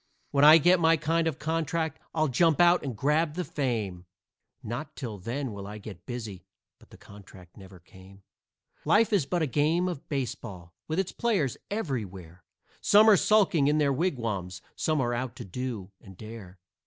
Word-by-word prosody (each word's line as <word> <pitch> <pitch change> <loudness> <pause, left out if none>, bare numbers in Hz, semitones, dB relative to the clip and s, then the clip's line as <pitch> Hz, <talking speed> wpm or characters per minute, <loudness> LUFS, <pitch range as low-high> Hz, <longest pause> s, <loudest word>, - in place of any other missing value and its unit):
When 140 0 +2
I 155 +2 +10
get 175 +3 +4
my 165 0 +4
kind 165 +2 0
of 155 -4 -2
contract, 160 0 -2
I'll 155 -1 +1
jump 155 +5 +2
out 175 0 +5
and 130 -6 -5
grab 150 +4 +1
the 180 - -2
fame, 110 -12 -3 0.6
Not 120 +8 -6
till 110 -7 -6
then 125 +6 -4
will 100 -1 -8
I 105 +1 -8
get 100 -4 -11
busy" 110 -7 -6 0.4
but - - -21
the - - -15
contract 95 -3 -15
never 95 -2 -13
came. 95 +3 -17 0.6
Life 210 +8 +3
is 175 -9 +2
but 175 -2 0
a - - +2
game 155 +6 +1
of 175 -6 -6
baseball, 115 - -5
with 160 - -3
its 190 -1 -1
players 195 - 0
everywhere; 100 - -5 0.4
Some 210 +2 +6
are - - +7
sulking 190 -8 +3
in 150 +1 +2
their 145 -2 +2
wigwams, 115 - -2 0.2
some 155 -1 0
are 120 -1 -1
out 125 0 -3
to - - -8
do 105 -1 -5
and 95 -2 -14
dare. 110 -4 -10
135 Hz, 180 wpm, -27 LUFS, 100-160 Hz, 0.6 s, I